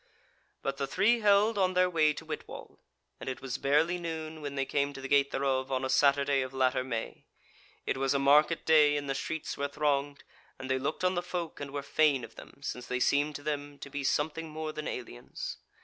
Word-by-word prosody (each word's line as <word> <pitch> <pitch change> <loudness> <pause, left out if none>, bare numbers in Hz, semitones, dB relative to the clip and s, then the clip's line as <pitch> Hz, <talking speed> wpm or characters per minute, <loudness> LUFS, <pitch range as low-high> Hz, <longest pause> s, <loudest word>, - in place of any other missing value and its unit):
But 135 0 -2
the 140 - -2
three 235 +10 +3
held 205 +1 +4
on 185 -1 +2
their 180 0 +5
way 160 -4 +3
to - - -8
Whitwall, - - -8 0.4
and - - -5
it 130 - -4
was 135 0 -4
barely 155 +6 +2
noon 160 -2 -5
when 145 -1 -5
they 135 -1 0
came 140 +1 0
to 135 - -8
the 135 - -5
gate 140 0 +4
thereof 135 -1 -1
on 130 0 0
a 130 - -1
Saturday 140 0 +3
of 130 0 -5
latter 130 0 +2
May, 115 -3 -5 0.6
It - - -1
was 135 +1 +1
a - - +4
market 150 +4 +4
day, 150 -2 +5
and 145 -1 -4
the 135 - 0
streets 160 +3 -4
were 140 - -1
thronged, 145 -1 -1 0.3
and 130 0 -5
they 130 - +1
looked 150 +6 -3
on 185 0 +3
the 175 - 0
folk 175 -2 -5
and 145 -1 -5
were 140 0 -4
fain 140 -2 +2
of - - -9
them, - - -14
since 125 -3 -5
they 125 - -1
seemed 145 +3 +2
to 145 - -7
them 145 -1 -4
to 140 - -10
be 145 0 -4
something 155 +3 -1
more 155 0 -4
than 155 -1 -5
aliens. 115 - -6
145 Hz, 225 wpm, -30 LUFS, 135-155 Hz, 0.6 s, their